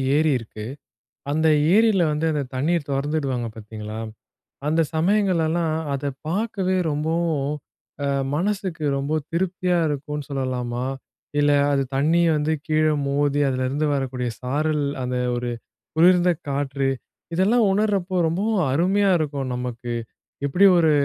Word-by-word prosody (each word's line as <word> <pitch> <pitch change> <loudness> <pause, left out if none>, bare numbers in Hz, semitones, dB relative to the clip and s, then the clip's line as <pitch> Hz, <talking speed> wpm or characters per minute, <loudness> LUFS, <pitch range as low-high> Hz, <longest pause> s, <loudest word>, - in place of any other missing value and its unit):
ஏரி 155 +1 +3
இருக்கு. 110 -1 -9 0.7
அந்த 160 +2 +1 0.3
ஏரில 215 -2 +4
வந்து 150 +2 0
அந்த 150 - 0
தண்ணீர் 150 +4 0
தொறந்து 140 +3 -1
விடுவாங்க 130 -5 -2
பார்த்தீங்களா, 110 0 -7 0.7
அந்த 160 +2 +3
சமயங்களெல்லாம் 170 -3 +2 0.2
அத 140 +1 -2 0.2
பார்க்கவே 190 0 0
ரொம்பவும், 155 -1 0 0.6
அ - - 0 0.3
மனசுக்கு 185 -2 -2
ரொம்ப 145 +3 0
திருப்தியா 180 0 0
இருக்குன்னு 150 0 -4
சொல்லலாமா. 125 -2 -2 0.5
இல்ல 145 0 +4 0.2
அது 140 -1 +2
தண்ணிய 165 +5 +3
வந்து 150 +1 0
கீழ 155 0 +2 0.2
மோதி 145 +1 +1
அதிலருந்து 130 +4 0
வரக்கூடிய 130 -2 -2
சாரல், 150 +3 0 0.2
அந்த 125 0 -2 0.2
ஒரு 120 0 -2 0.4
குளிர்ந்த 175 +2 +5 0.2
காற்று. 140 -1 -1 0.5
இதெல்லாம் 210 +5 +3
உணர்றப்போ, 200 -3 0
ரொம்பவும் 195 +3 0
அருமையா 190 +7 +2
இருக்கும் 140 -4 -2
நமக்கு. 125 -1 -4 0.5
எப்பிடி 175 +8 +4
ஒரு 160 -2 +4
150 Hz, 120 wpm, -23 LUFS, 135-175 Hz, 0.7 s, குளிர்ந்த